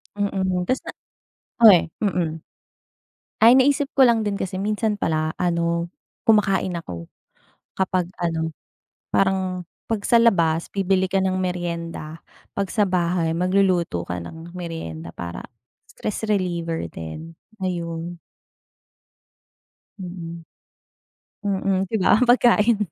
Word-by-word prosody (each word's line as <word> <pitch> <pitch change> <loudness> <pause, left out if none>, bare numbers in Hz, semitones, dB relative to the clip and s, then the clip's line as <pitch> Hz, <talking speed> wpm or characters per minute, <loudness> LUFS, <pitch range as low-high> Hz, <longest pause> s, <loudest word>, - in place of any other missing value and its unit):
Mm, 190 -3 -1
tas 260 - +1
na - - -5 0.7
o 220 - +12
eh, 180 -4 +5
mm. 170 -6 -1 1.0
Ay, 235 +3 +8
naisip 280 +1 +3
ko 265 - +8
lang 235 -2 +4
din 205 -2 -1
kasi 190 -1 -3
minsan 210 +1 0
pala, 155 -2 0
ano, 170 -1 0 0.4
kumakain 195 -4 +3
ako. 85 - -7 0.7
Kapag 185 -2 0
ano, 165 -2 -1 0.6
parang 190 -2 +1 0.2
'pag 225 -3 -2
sa 235 - +4
labas 170 -8 +3
bibili 190 -1 +2
ka 190 +1 0
ng 185 0 0
meryenda. 170 -3 -4 0.4
'Pag 200 - 0
sa 205 -3 +2
bahay, 170 -2 0
magluluto 180 - +2
ka 90 +1 -5
ng 160 - -9
meryenda 85 - -6
para 85 0 -6 0.4
stress 215 +1 -4
reliever 170 - -1
din, 155 - -8 0.2
ayun. 170 -2 -3 1.8
Mm. 170 -2 -7 1.0
Mhm, 195 -1 +1
di - - 0
ba, - - +5
ang 250 - +3
pagkain. 240 -2 +5
180 Hz, 120 wpm, -23 LUFS, 165-200 Hz, 1.8 s, o